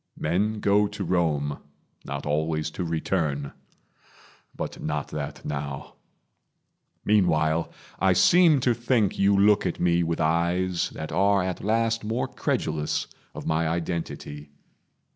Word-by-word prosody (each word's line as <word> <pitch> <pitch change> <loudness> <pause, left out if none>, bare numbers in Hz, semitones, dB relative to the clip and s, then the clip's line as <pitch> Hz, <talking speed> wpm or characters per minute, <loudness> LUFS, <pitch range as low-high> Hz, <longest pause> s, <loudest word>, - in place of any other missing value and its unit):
Men 105 +7 0
go 105 +1 +3
to 100 -1 -6
Rome, 80 -5 0 0.5
Not - - -5
always 75 +1 -1
to 90 - -4
return 80 -4 -1 1.0
but - - -5
not - - -3
that 75 0 -6
now. 70 -1 -5 1.1
Meanwhile, 85 -6 +2 0.3
I 95 -1 +4
seem 165 - +5
to 120 -1 +3
think 120 -4 0
you 100 0 +4
look 105 +1 +4
at 85 - -4
me 85 -1 +2
With 85 -1 -1
eyes 85 +2 +1
that 80 - -6
are 100 +3 +3
at 90 -1 -4
last 115 +2 +1
more 110 +4 -1
credulous 75 -1 -2 0.3
Of - - -7
my 80 +1 +1
identity. 80 -3 -4
85 Hz, 125 wpm, -25 LUFS, 80-100 Hz, 1.1 s, seem